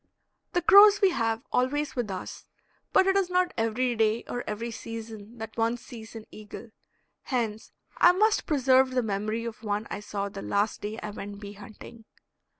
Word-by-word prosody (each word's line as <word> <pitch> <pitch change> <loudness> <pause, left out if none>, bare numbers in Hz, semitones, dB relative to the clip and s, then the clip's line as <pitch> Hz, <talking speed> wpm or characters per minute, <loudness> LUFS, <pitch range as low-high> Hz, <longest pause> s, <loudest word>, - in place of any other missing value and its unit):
The 350 - +1
crows 405 +3 +8
we 390 -2 +4
have 225 -4 -1
always 285 +4 0
with 240 -4 -2
us, 185 -1 -7 0.4
but 380 - +5
it 385 0 +2
is 390 -2 +2
not 360 0 +1
every 235 +2 0
day 220 0 +1
or 245 - -4
every 230 +3 -4
season 225 0 -8
that 220 0 -8
one 230 +1 0
sees 230 -2 -11
an 220 -1 -8
eagle. 215 +1 -10 0.5
Hence 225 -5 -3 0.3
I 350 - +7
must 425 +4 +2
preserve 265 -3 +4
the 250 - +2
memory 215 +2 -2
of 225 -2 -7
one 210 0 -2
I 195 - -3
saw 205 -1 -4
the 195 0 -8
last 205 +2 -1
day 215 +2 -5
I 210 - -4
went 205 0 -8
bee 205 -1 -8
hunting. 215 +2 -13
225 Hz, 180 wpm, -27 LUFS, 210-255 Hz, 0.5 s, crows